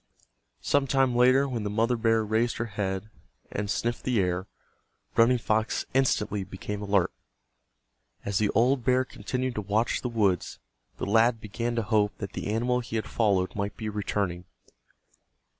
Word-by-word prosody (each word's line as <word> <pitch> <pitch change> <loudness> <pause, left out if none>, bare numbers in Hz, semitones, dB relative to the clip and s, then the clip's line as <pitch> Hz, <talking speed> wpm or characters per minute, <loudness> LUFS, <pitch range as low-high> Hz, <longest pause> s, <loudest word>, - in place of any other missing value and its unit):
Some 145 -1 +2
time 135 -2 +2
later 130 +3 +5
when 120 -4 -3
the 105 - -2
mother 115 +4 +1
bear 115 -1 +2
raised 110 +3 +1
her 120 - -1
head 100 -1 -3 0.4
and 100 0 -3
sniffed 120 +3 -1
the 125 -4 +1
air, 90 0 0 0.7
Running 120 +2 +5
Fox 110 0 0
instantly 105 -6 +1
became 100 +2 -6
alert. 100 -3 +1 1.1
As 100 -1 0
the 105 -1 +2
old 125 +3 +3
bear 130 +1 +3
continued 125 +3 -3
to 105 - -3
watch 105 +3 0
the 125 - -2
woods, 100 -6 0 0.4
the - - -3
lad 115 +3 +3
began 115 +3 -3
to 115 - 0
hope 105 -1 +1
that 100 - -6
the - - -4
animal 120 +4 +1
he 120 -2 -6
had 110 - -1
followed 100 -5 +1
might 100 0 -3
be 110 -1 -4
returning. 100 -4 -2
110 Hz, 160 wpm, -27 LUFS, 100-120 Hz, 1.1 s, later